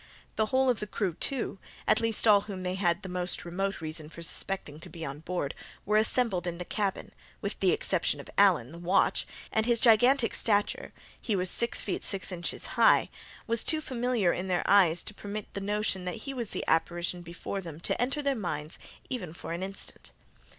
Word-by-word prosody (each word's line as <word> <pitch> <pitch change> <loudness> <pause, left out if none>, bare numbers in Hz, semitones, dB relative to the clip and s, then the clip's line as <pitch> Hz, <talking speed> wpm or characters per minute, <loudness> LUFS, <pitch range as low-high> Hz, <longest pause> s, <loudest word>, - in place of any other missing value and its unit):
The 220 - +2
whole 260 +3 +3
of 245 -3 +3
the 210 - -3
crew, 195 -4 -1
too—at 235 - -1
least 225 0 +2
all 205 -2 +7
whom 195 -3 -6
they 180 0 -1
had 185 -1 +1
the - - -5
most 180 -1 -2
remote 195 +2 -2
reason 155 -1 -5
for 170 +1 -9
suspecting 165 -3 -3
to - - -8
be 165 -2 -6
on 140 +1 -5
board—were 180 +5 -4
assembled 215 -5 +2
in 170 -1 -3
the 180 - -5
cabin, 200 0 -2 0.3
with - - -4
the - - +4
exception - - +1
of - - -9
Allen, 175 -11 +4
the 170 - -9
watch; 175 +2 +2 0.2
and 220 +1 +1
his 235 -1 +3
gigantic 245 +2 +5
stature 205 -2 +1 0.3
(he 215 - 0
was 185 -1 0
six 235 0 -1
feet 195 - -2
six 195 0 -3
inches 175 -2 -3 0.2
high) - - +6 0.3
was 230 0 +1
too 315 - +3
familiar 245 - +1
in 185 - -3
their 180 -1 +1
eyes 180 -4 +5
to 210 - -6
permit 205 0 -6
the 200 - -4
notion 205 -2 0
that 180 - -2
he 275 - -3
was 240 -5 -3
the - - -3
apparition 175 +2 +1
before 175 +3 -5
them 165 -4 -8
to - - -1
enter 270 +4 0
their 280 -1 +2
minds 160 - -2 0.3
even 235 -11 -4
for 170 - -6
an 170 - -4
instant. 195 +1 -5
195 Hz, 200 wpm, -29 LUFS, 175-220 Hz, 0.3 s, all